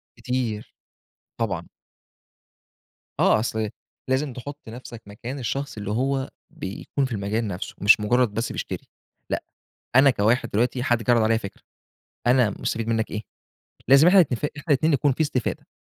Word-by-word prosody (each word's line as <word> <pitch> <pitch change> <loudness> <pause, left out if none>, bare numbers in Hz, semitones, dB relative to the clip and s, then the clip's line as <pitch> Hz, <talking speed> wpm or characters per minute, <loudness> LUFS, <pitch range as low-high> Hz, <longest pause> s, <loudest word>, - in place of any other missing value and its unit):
كتير، 120 -3 -3 0.7
طبعًا. 90 -7 -1 1.5
آه - - +5
أصل 110 -1 -1 0.4
لازم 130 +1 0
تحط 140 +4 -7
نَفْسك 120 0 -9
مكان 120 +7 -7
الشخص 135 +2 -3
اللي 105 -1 -4
هو 135 +4 0 0.2
بيكون 115 +8 -3
في 130 - -6
المجال 105 +1 -1
نَفْسه، 95 -1 -5
مش 105 +3 +7
مجرّد 120 +1 +2
بس 115 +2 -2
بيشتري، - - -5 0.4
لأ، - - -1 0.5
أنا 135 +2 +8
كواحد 115 0 +2
دلوقتي 120 +3 +1
حد 120 -3 +1
جِه 115 - +2
عَرَض 120 -1 +5
عليّا 110 +1 +3
فِكرة، 100 -3 -8 0.7
أنا 125 -3 +4
مستفيد 115 +3 -3
مِنّك 115 -1 0
إيه؟ 105 - -4 0.7
لازم 140 +5 +8
إحنا 190 +1 +7
نتفق، 145 -3 +1
إحنا 145 - -9
الاتنين 155 +2 +3
يكون 140 0 +3
في 130 - -9
استفادة، 140 -6 -1
120 Hz, 150 wpm, -24 LUFS, 110-135 Hz, 1.5 s, أنا